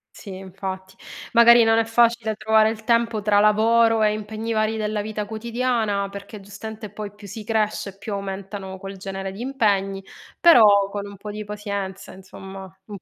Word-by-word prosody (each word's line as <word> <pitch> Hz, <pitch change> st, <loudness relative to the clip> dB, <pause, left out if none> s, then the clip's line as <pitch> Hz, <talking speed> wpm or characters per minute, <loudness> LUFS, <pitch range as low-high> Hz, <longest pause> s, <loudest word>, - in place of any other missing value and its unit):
Sì, 195 Hz, -3 st, -9 dB
infatti. 190 Hz, 0 st, -7 dB, 0.4 s
Magari 235 Hz, 0 st, +7 dB
non 225 Hz, 0 st, +4 dB
è 225 Hz, -, +1 dB
facile 230 Hz, -1 st, +2 dB
trovare 220 Hz, 0 st, +3 dB
il 220 Hz, 0 st, -6 dB
tempo 230 Hz, -2 st, +1 dB
tra 205 Hz, -1 st, +3 dB
lavoro 225 Hz, +1 st, +4 dB
e 210 Hz, -, +3 dB
impegni 215 Hz, +2 st, -4 dB
vari 215 Hz, 0 st, 0 dB
della 215 Hz, -1 st, -2 dB
vita 210 Hz, 0 st, -4 dB
quotidiana, 225 Hz, -2 st, -1 dB
perché 200 Hz, +2 st, -9 dB
giustamente 210 Hz, +2 st, -9 dB
poi 205 Hz, -1 st, -8 dB
più 205 Hz, -, -14 dB
si 215 Hz, +3 st, -8 dB
cresce, 210 Hz, -2 st, -2 dB
più 205 Hz, +1 st, -6 dB
aumentano 195 Hz, 0 st, -6 dB
quel 195 Hz, 0 st, -8 dB
genere 195 Hz, 0 st, -5 dB
di 195 Hz, -, -9 dB
impegni. 200 Hz, -7 st, 0 dB, 0.4 s
Però 210 Hz, -, +6 dB
con 205 Hz, 0 st, -5 dB
un 200 Hz, -1 st, -11 dB
po' 210 Hz, +1 st, -7 dB
di 215 Hz, +1 st, -6 dB
pazienza, 200 Hz, -2 st, -6 dB
insomma, 190 Hz, +1 st, -11 dB, 0.2 s
un 205 Hz, -2 st, -8 dB
po' -, -, -59 dB
210 Hz, 175 wpm, -23 LUFS, 195-225 Hz, 0.4 s, Magari